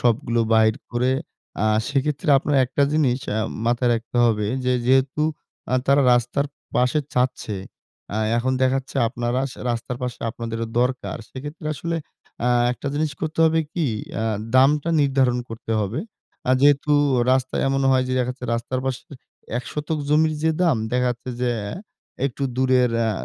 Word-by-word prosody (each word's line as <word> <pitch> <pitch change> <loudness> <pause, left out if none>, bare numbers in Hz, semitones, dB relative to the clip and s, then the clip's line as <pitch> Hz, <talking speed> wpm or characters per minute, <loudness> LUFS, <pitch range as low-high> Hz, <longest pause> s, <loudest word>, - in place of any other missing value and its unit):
সবগুলো 120 0 +1
বাহির 110 0 +4 0.2
করে 125 +2 +1 0.5
আ - - +3 0.2
সেক্ষেত্রে 145 +1 -1
আপনার 145 +1 0
একটা 140 - 0
জিনিস 140 -5 +2 0.2
আ - - +1 0.3
মাথায় 120 +1 +2
রাখতে 115 +1 -5
হবে 105 -3 +2 0.2
যে 125 - +2
যেহেতু 135 +3 +3 0.5
আ - - +4
তারা 140 +1 +5
রাস্তার 120 +4 +1 0.3
পাশে 125 +5 +2
চাচ্ছে, 125 -4 0 0.6
আ - - -1 0.2
এখন 130 +2 0
দেখাচ্ছে 130 +1 0
আপনারা 120 +1 -1
স্য - - -14
রাস্তার 120 +1 -3
পাশে 125 -1 -3
আপনাদেরও 115 0 -4
দরকার। 125 +1 -1
সেক্ষেত্রে 145 +4 -8
আসলে 165 +4 -3 0.5
আ - - +4 0.2
একটা 125 - -8
জিনিস 155 +1 0
করতে 155 0 -4
হবে 160 0 +3
কি 170 -4 0 0.3
আ - - -1 0.3
দামটা 145 +4 +4
নির্ধারণ 135 -3 +2
করতে 115 0 -5
হবে। 105 +3 -2 0.5
আ - - +4
যেহেতু 145 +1 +4 0.4
রাস্তায় 130 0 0
এমন 135 0 +1
হয় 130 -1 +3
যে - - -1
দেখাচ্ছে 125 +1 -3
রাস্তার 120 +2 -2
পাশের 130 -1 -4 0.5
১ 125 - -7
শতক 150 +1 -2
জমির 155 +1 +3
যে 160 - +3
দাম 170 -7 +3 0.2
দেখাচ্ছে 125 0 -1
যে 125 -1 +1 0.8
একটু 140 +1 -6
দূরের 130 -1 +3
অ্যা 115 -1 +2
130 Hz, 155 wpm, -23 LUFS, 120-145 Hz, 0.8 s, তারা